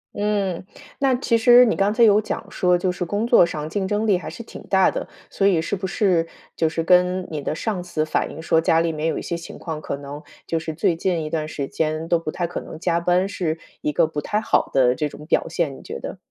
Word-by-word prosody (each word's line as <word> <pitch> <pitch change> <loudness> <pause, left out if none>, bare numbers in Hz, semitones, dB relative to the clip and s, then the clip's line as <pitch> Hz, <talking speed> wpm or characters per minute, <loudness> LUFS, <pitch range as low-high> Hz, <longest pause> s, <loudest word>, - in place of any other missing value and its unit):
嗯， 205 -4 -1 0.4
那 270 -2 +3
其 235 -2 +1
实 245 +2 +7
你 225 - +1
刚 195 +1 +2
才 230 +2 +3
有 210 -1 +6
讲 - - -4
说， 180 -1 +2
就 180 +1 0
是 180 - -4
工 205 +6 -1
作 235 -6 +6
上 155 -3 -2
竞 190 +4 -2
争 210 +2 0
力 205 -3 +4
还 155 -3 -7
是 200 +9 -8
挺 - - -11
大 190 -1 +4
的。 - - -4 0.2
所 195 - +2
以 180 -5 +3
是 165 - -2
不 190 0 -4
是 175 -4 +1 0.3
就 160 - +1
是 165 +1 -2
跟 180 +1 +3
你 150 - -3
的 150 - -3
上 185 0 -3
司 155 -3 -2
反 - - -1
映 - - -9
说 160 0 +2
家 165 0 +3
里 165 0 +1
面 155 +1 -2
有 - - -2
一 - - -5
些 170 - -3
情 170 0 -8
况， 160 -3 -6
可 140 - -4
能 145 +1 -8 0.2
就 165 - -1
是 160 0 -5
最 165 +1 +1
近 170 -1 -1
一 155 - -5
段 155 -2 -1
时 140 -3 -4
间 155 +2 -2
都 170 -1 +2
不 165 - -5
太 175 - -2
可 175 - -5
能 - - -9
加 170 -1 +1
班， 180 +2 +2
是 170 -5 -2 0.2
一 150 - 0
个 150 - +3
不 150 -2 -4
太 210 - -1
好 - - +1
的 125 -2 +4
这 150 +2 -2
种 150 - -11
表 - - +1
现， 165 -4 -1
你 - - -12
觉 - - -7
得？ - - -7
170 Hz, 285 characters per minute, -22 LUFS, 160-195 Hz, 0.4 s, 实